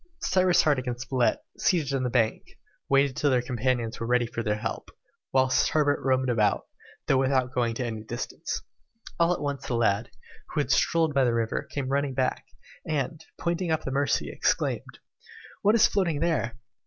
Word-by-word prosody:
Cyrus 185 -1 +3
Harding 135 -4 +1
and 120 -1 -3
Spilett, 130 -1 +1 0.2
seated 155 -7 +1
on 135 - 0
the 125 - 0
bank, 115 -3 +1 0.5
waited 135 -1 +3
till 145 - +1
their 125 -2 +2
companions 120 -1 -1
were 115 - -3
ready 125 0 +3
for 115 0 -4
their 105 -2 0
help, 110 +1 -5 0.4
whilst 130 0 +3
Herbert 145 -2 +1
roamed 130 -1 +2
about, 110 -4 +1 0.4
though 135 - +3
without 130 -1 +1
going 120 -2 0
to 125 - -2
any 110 -2 -4
distance. 120 +2 -5 0.6
All 170 +1 +4
at 180 - -1
once, 140 -2 -3
the 120 - -1
lad, 110 -2 +1 0.4
who 155 - -2
had 145 - 0
strolled 165 -2 +2
by 135 -1 +3
the 120 -2 +2
river, 115 -1 -1
came 135 -2 -3
running 140 -1 0
back, 130 -1 -1 0.4
and, 155 +1 -2 0.2
pointing 175 0 -1
up 160 -1 0
the 135 - -3
Mercy, 140 +1 0
exclaimed, - - -1 0.6
"What 210 +3 +4
is 230 - +6
floating 170 -7 +1
there?" 150 -8 0
130 Hz, 180 wpm, -27 LUFS, 120-150 Hz, 0.6 s, is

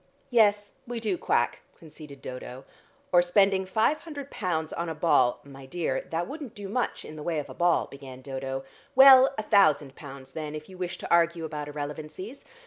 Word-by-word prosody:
"Yes, 205 -3 +3
we 240 -1 -4
do 215 -4 -1
quack," 120 -7 0 0.2
conceded 150 -3 -13
Dodo. 125 +1 -8 0.5
"Or 175 - +6
spending 190 +1 +2
five 220 +10 +2
hundred 285 -4 -8
pounds 160 -6 -2
on 170 0 -3
a 160 - -4
ball 140 -6 +3
" - - -30
"My 135 -1 -12
dear, 155 -4 -2
that 170 +2 -2
wouldn't 285 -6 -8
do 205 -2 -7
much 240 +5 -2
in 155 - -9
the - - -7
way 165 +1 -2
of 150 - -4
a - - -8
ball," 175 -1 +2
began 130 -2 -11
Dodo. 135 0 -4 0.3
"Well, 265 0 +9
a 215 - -2
thousand 155 - +3
pounds 135 -2 -11
then, 155 0 -5
if 155 0 -8
you 190 - -11
wish 175 -1 -3
to - - -8
argue 170 -1 +3
about 150 -2 -5
irrelevancies. 150 - -7
165 Hz, 195 wpm, -27 LUFS, 145-205 Hz, 0.5 s, Well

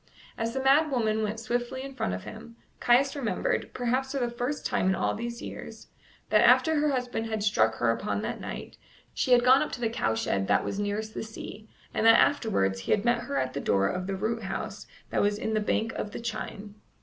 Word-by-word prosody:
As 230 +2 -3
the 265 - -1
mad 290 +4 +5
woman 220 -5 +1
went 215 +1 -2
swiftly 240 +3 -2
in 275 0 -7
front 225 - -2
of 95 - -7
him, 225 +1 -10 0.2
Caius 265 +4 +3
remembered, 285 - -1
perhaps 255 +2 -1
for - - -1
the 240 -2 -1
first 245 +5 -3
time - - +1
in 190 - +2
all - - 0
these 235 +2 -5
years, - - -9 0.4
that - - +6
after 320 -2 +5
her 300 0 +2
husband 250 -4 -2
had 220 -2 -2
struck 110 - +3
her 115 0 +2
upon 105 -3 -2
that - - -4
night, - - -7 0.4
she 255 - -1
had 245 -1 +6
gone 260 +2 +6
up - - -2
to - - -5
the 230 -2 0
cowshed 110 - -1
that - - +2
was 200 - -3
nearest 210 +2 -2
the - - -4
sea, 220 -1 -9 0.2
and - - 0
that 225 - +8
afterwards 95 - +2
he 95 - -4
had 205 - 0
met 240 0 +2
her 140 - -3
at 130 -1 -1
the 140 - -3
door 100 0 +2
of 180 0 -3
the 195 - -2
root 220 +4 -2
house 210 +1 -5 0.2
that - - +1
was 205 0 +1
in 220 0 -2
the 215 - +2
bank 220 +1 0
of - - -4
the - - -5
chine. 210 -3 -5
225 Hz, 230 wpm, -28 LUFS, 200-245 Hz, 0.4 s, that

